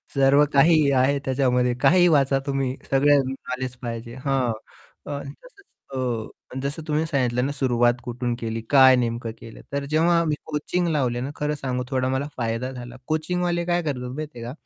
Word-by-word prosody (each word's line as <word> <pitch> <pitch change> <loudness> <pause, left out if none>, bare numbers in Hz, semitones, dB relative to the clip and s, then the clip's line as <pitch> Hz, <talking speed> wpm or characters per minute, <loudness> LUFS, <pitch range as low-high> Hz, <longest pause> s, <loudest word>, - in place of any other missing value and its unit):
सर्व 135 +1 +5
काही 150 0 +5
आहे 135 +1 +3
त्याच्यामध्ये, 125 -2 +1
काहीही 175 0 +5
वाचा 135 -3 +3
तुम्ही, 135 -2 -1
सगळं 140 +1 +5
नॉलेज 130 -1 -5
पाहिजे. 115 0 -6
हां. 135 -3 +1 0.6
अ, 140 - -3
तसंच 400 - -13 1.0
अ, - - -5
जसं 145 +3 -3
तुम्ही 155 +1 0
सांगितलं 125 -4 0
ना, 140 - -1
सुरुवात 120 -3 +2
कुठून 120 -1 -3
केली? 115 0 -3
काय 130 -2 +7
नेमकं 115 -1 -2
केलं? 115 - -11
तर 140 0 -2
जेव्हा 170 +2 +3
मी 155 -2 0
कोचिंग 160 +4 -1
लावले 130 -7 0
ना 130 - -3
खरं 150 0 -1
सांगू 130 -3 -3
थोडा 130 -2 0
मला 130 +2 -1
फायदा 115 +1 -2
झाला. 120 -1 -9
कोचिंगवाले 175 +2 -1
काय 175 0 +1
करतात 125 -5 -3
माहिती 150 -4 -6
आहे 115 - -7
का? - - -5
135 Hz, 170 wpm, -24 LUFS, 125-150 Hz, 1.0 s, काय